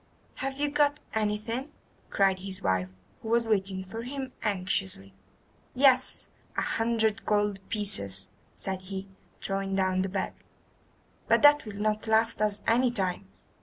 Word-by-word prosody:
"Have 270 +1 -3
you 295 - +2
got 295 0 +2
anything?" 220 +5 -1 0.4
cried 195 -1 +2
his 190 0 -5
wife, 95 -1 +1 0.3
who - - -8
was 235 0 +3
waiting 195 -3 0
for 225 +5 -7
him 265 +1 -5
anxiously. 185 - -1 0.6
"Yes, 260 -1 +4 0.3
a - - +2
hundred 225 -1 0
gold 205 -1 +1
pieces," 195 - +1 0.3
said 190 -1 -3
he, 190 +1 -6 0.4
throwing 195 0 -1
down 185 -1 +1
the 190 - -1
bag, 190 0 -2 0.9
"but - - +4
that 290 -2 +7
will 205 -1 -7
not 215 +1 0
last 220 0 +3
us 210 -1 0
any 245 +2 +4
time. 190 - -2
210 Hz, 140 wpm, -28 LUFS, 190-230 Hz, 0.9 s, that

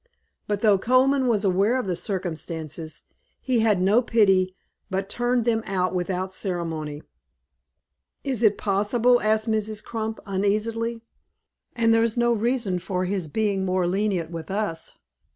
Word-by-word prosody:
But 205 -1 -1
though 210 -3 +4
Colman 260 +4 +3
was 220 -4 +2
aware 200 +6 +2
of 255 - -2
the 185 -2 -1
circumstances, 165 -4 -4 0.4
he 255 -3 0
had 215 -4 +3
no 200 +6 +4
pity; 195 -6 +3 0.3
but 195 +1 -2
turned 240 -1 0
them 225 -2 +2
out 185 -1 0
without 185 +1 -2
ceremony." 165 -6 -3 1.2
"Is 260 -5 -1
it 210 -3 +4
possible?" 220 +5 +2
asked 215 +1 +1
Mrs. 215 -1 -1
Crump, 220 -1 -4
uneasily. 220 +4 -1 0.7
"And 230 -1 +3
there's 225 0 +2
no 240 0 +3
reason 230 -4 0
for 185 0 -2
his 185 -3 -2
being 200 +3 0
more 185 -1 +1
lenient 185 -3 0
with 165 0 -7
us. 195 -5 -3
205 Hz, 140 wpm, -24 LUFS, 185-230 Hz, 1.2 s, though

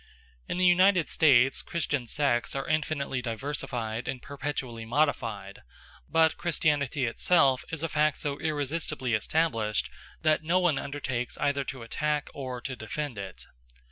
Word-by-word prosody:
In - - -2
the 185 - +3
United 180 -1 +5
States 135 -4 +4
Christian 145 -6 -2
sects 130 -2 0
are 135 - -3
infinitely 150 -4 -1
diversified 120 -2 -3
and 130 -1 -3
perpetually 135 -5 -5
modified; 115 -6 -1 0.5
but 160 -1 +3
Christianity 150 -5 +1
itself 135 +2 +3
is 165 -1 -3
a - - +1
fact 155 -1 +2
so 145 -1 -3
irresistibly 150 -4 -2
established, 115 -3 0 0.3
that 155 -1 +3
no 170 +4 +2
one 175 -6 +2
undertakes 130 -4 -3
either 140 -1 +1
to 130 -3 -6
attack 150 +5 -1
or 130 -3 -5
to 130 0 -4
defend 125 +1 -5
it. 95 -2 -8
140 Hz, 140 wpm, -28 LUFS, 120-155 Hz, 0.5 s, United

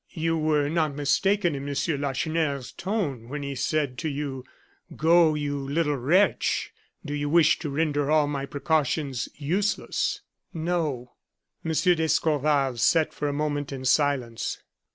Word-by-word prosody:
"You 165 0 0
were 155 -2 +1
not 155 -2 0
mistaken 175 +5 +2
in 140 0 -5
Monsieur 145 +2 -1
Lacheneur's 140 0 -1
tone 165 - -3
when 145 +1 -4
he 140 0 -4
said 140 -1 -1
to 160 - -2
you: 140 -2 -4 0.5
'Go, 165 0 +4
you 145 -1 -2
little 145 +2 0
wretch! 165 +11 +1 0.3
do 145 - -4
you 145 0 -2
wish 160 -1 +4
to 155 - -4
render 145 -1 0
all 155 -1 +4
my 140 -1 -3
precautions 145 -3 -1
useless?'" 180 +9 -1 0.3
"No." 155 -7 -2 0.5
M. 165 - -2
d'Escorval 150 -5 +2
sat 160 +6 +3
for 150 - -3
a - - 0
moment 145 -1 -2
in 130 -1 -6
silence. 130 -4 +1
145 Hz, 140 wpm, -26 LUFS, 140-160 Hz, 0.5 s, Go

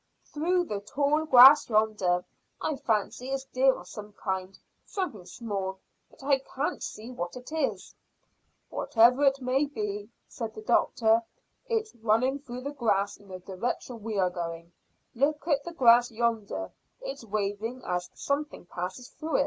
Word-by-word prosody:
"Through 355 +4 +1
the 210 -12 -4
tall 285 +9 0
grass 265 0 +9
yonder. 210 -5 +2 0.3
I 310 - -1
fancy 240 0 -1
it's 270 0 -2
deer 265 0 +3
of 175 - -11
some 210 +1 -9
kind; 190 -2 -4 0.3
something 265 - -4
small, 195 -5 -4 0.3
but - - -18
I 275 -1 +3
can't 270 +2 -3
see 225 +4 -6
what 175 -8 -5
it 250 +3 -10
is." 315 -3 -2 0.8
"Whatever 245 +4 +4
it 275 0 +3
may 260 +3 +1
be," 210 -5 -4 0.2
said 225 -3 -6
the 215 - -8
doctor, 225 0 +3 0.5
"it's 445 -2 -1
running 235 +5 +2
through 250 -3 -8
the 280 +2 -4
grass 205 -7 0
in 205 - -19
the 185 -1 -7
direction 215 +5 -4
we 215 -1 -3
are 185 -2 +2
going. 170 -1 -5 0.4
Look 295 +5 0
at 285 -4 +2
the 345 - -5
grass 245 -5 +5
yonder, 230 -2 -2 0.3
it's - - -6
waving 215 +4 -3
as 180 0 -2
something 285 -6 -3
passes 185 +8 -6
through." 315 0 -2
235 Hz, 155 wpm, -28 LUFS, 205-275 Hz, 0.8 s, grass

